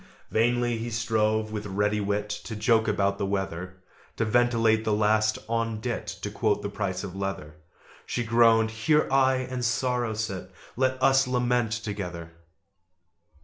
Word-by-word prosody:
Vainly 120 +1 +1
he 115 +1 -4
strove, 110 -1 0
with 105 -1 -4
ready 105 +2 0
wit, 100 +1 -1 0.2
To 110 - -5
joke 110 +1 +2
about 100 -1 +1
the 100 - 0
weather 95 -1 -4 0.3
To 115 - +1
ventilate 115 -1 +3
the 110 - 0
last 110 +1 +2
'on 115 -1 -1
dit' 115 -2 -4
To 100 +1 -5
quote 105 0 0
the 100 - -2
price 100 -2 -3
of 95 -2 -7
leather 95 -6 -5 0.5
She 120 - -1
groaned 115 -1 +4
"Here 150 +8 +2
I 130 -1 +4
and 130 -1 -3
Sorrow 120 -1 0
sit: 95 -4 -4 0.2
Let 130 +1 +1
us 135 0 +4
lament 125 -2 +1
together!" 95 -7 -5
110 Hz, 150 wpm, -26 LUFS, 100-120 Hz, 0.5 s, groaned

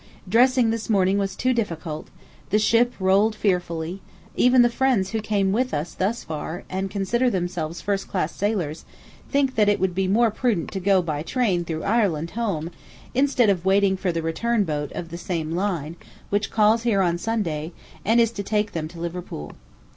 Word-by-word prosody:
Dressing 245 +3 +4
this 230 0 -4
morning 195 -1 +3
was 195 -1 -2
too 255 0 +1
difficult, 165 -9 -3 0.4
the 210 - +3
ship 230 +3 +3
rolled 195 +3 +3
fearfully, 180 -3 -1 0.3
even 250 0 +5
the - - +5
friends 235 -6 +1
who 220 -1 -1
came 200 -2 +1
with 250 +5 0
us 155 +3 -3
thus 215 +5 -1
far, 160 +3 -5
and 190 +1 -2
consider 215 +6 +1
themselves 175 -4 -3
first 200 -1 -2
class 170 -4 -2
sailors, 185 -7 -2 0.5
think 275 -2 +1
that 210 -2 +3
it 205 - +2
will 190 - +2
be 185 +1 -1
more 225 +4 +3
prudent 215 -7 -1
to 195 - -3
go 190 0 +3
by 150 -3 -2
train 190 -1 0
through 160 -2 -4
Ireland 195 -7 +1
home, 190 -8 -2 0.4
instead 260 -4 +3
of 180 -3 -1
waiting 195 0 +3
for 185 -1 -1
the 165 -1 -3
return 210 +8 0
boat 150 -4 -3
of 170 - -6
the 170 +1 -7
same 165 -4 -3
line 170 -3 -2 0.3
which 205 0 0
calls 220 +1 +3
here 215 -5 +2
on 175 -1 0
Sunday 175 -8 -2 0.3
and 225 +3 +3
is 230 -1 +4
to 210 - -5
take 210 +1 0
them 155 -2 -3
to 170 +1 -12
Liverpool. 170 - -6
195 Hz, 185 wpm, -24 LUFS, 170-225 Hz, 0.5 s, even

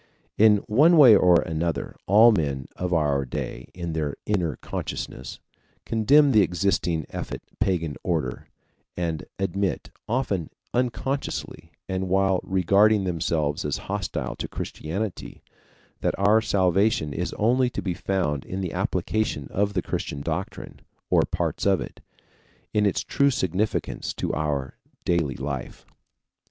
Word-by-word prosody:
In 105 -1 +5
one 150 +10 +5
way 130 -8 +9
or 90 -3 +5
another 80 -3 -2
all 110 +5 +7
men 70 - -1
of 90 0 -3
our 75 -5 +2
day 65 - -5
in 85 -2 -4
their 75 -3 -2
inner 90 -9 0
consciousness 65 - -6 0.5
condemn 140 +6 +4
the 110 -4 +6
existing 90 -3 0
effete - - -5 0.2
pagan 85 -6 0
order, 80 -9 -2 0.5
and 85 -3 -2
admit, 95 0 -2 0.2
often 110 - -1 0.2
unconsciously 130 +3 -2 0.2
and 95 0 -2
while 95 0 +3
regarding 100 +3 +3
themselves 80 -4 -1
as 75 -2 -1
hostile 100 -3 -3
to - - -4
Christianity, 95 +5 -5 0.6
that - - -1
our 105 +3 +4
salvation 95 - +2
is 90 +4 -3
only 125 +4 +2
to - - -5
be 90 - -1
found 85 -7 -1
in 95 - -5
the 90 -3 -3
application 110 -10 -1
of 100 +1 0
the 90 - 0
Christian 70 - -4
doctrine, - - -5 0.3
or - - +5
parts - - -2
of 95 -2 +4
it, - - -8 0.7
in 105 -1 +3
its 100 - 0
true 140 0 +2
significance 105 - -1
to - - -2
our 70 -4 -2 0.3
daily 80 -7 +1
life. 70 -1 -5
95 Hz, 135 wpm, -25 LUFS, 80-105 Hz, 0.7 s, way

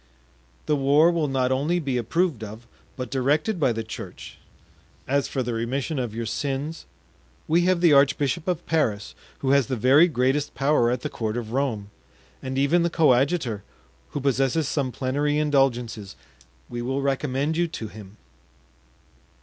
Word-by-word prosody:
"The 150 - +2
war 145 +4 +4
will 165 -3 0
not 130 -2 0
only 150 +7 +1
be 140 -6 -2
approved 160 - 0
of, 110 +2 -9 0.3
but 125 -2 -6
directed 150 - +1
by 135 -5 +3
the 115 0 -3
church. 110 - -9 0.7
As 140 +1 +1
for 130 - -2
the 120 0 -3
remission 130 +6 -2
of 120 -4 -3
your 115 0 -3
sins, 140 +7 -3 0.6
we 170 +2 +3
have 185 -1 +2
the 170 -4 +6
archbishop 145 +3 +2
of 175 -2 -1
Paris, 110 -11 0 0.3
who 135 - +1
has 140 -2 +4
the 130 - -1
very 135 +9 +5
greatest 135 0 0
power 135 -4 +2
at 125 0 -1
the - - -3
court 110 0 -3
of 115 -2 -5
Rome, 115 -6 -2 0.5
and 130 0 -4
even 140 +6 +3
the 170 - +1
coadjutor, 135 - +2 0.5
who 145 - -4
possesses 135 +2 +1
some 140 -4 -1
plenary 145 +4 -1
indulgences; 125 -8 0 0.5
we 120 - -5
will 135 +3 -2
recommend 140 +2 0
you 170 +1 +1
to 120 -9 -6
him." 105 -1 -12
135 Hz, 160 wpm, -24 LUFS, 120-150 Hz, 0.7 s, the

